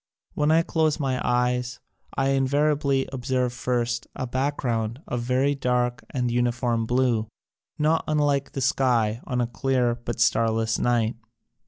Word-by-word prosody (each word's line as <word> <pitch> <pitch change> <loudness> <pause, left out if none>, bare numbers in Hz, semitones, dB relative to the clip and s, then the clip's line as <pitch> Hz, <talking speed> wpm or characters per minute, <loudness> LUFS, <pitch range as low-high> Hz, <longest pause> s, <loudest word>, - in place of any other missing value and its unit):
When 150 0 +1
I 165 +1 +4
close 160 -2 +1
my 130 -3 -1
eyes 125 0 0 0.4
I 135 0 +2
invariably 140 0 +1
observe 125 -1 -1
first, 120 -2 -1
a 130 - -3
back 135 +4 -1
ground 115 -1 -2
of 120 - -2
very 130 +4 +1
dark 125 -2 0
and 125 -3 -1
uniform 120 -1 0
blue, 120 -3 +1 0.5
not 155 +2 +2
unlike 145 -2 +1
the 135 - -3
sky 120 -3 +1
on 125 -1 -1
a - - +1
clear 120 +1 0
but 120 0 -6
starless 115 -1 +2
night. 120 -2 +1
125 Hz, 145 wpm, -25 LUFS, 120-135 Hz, 0.5 s, I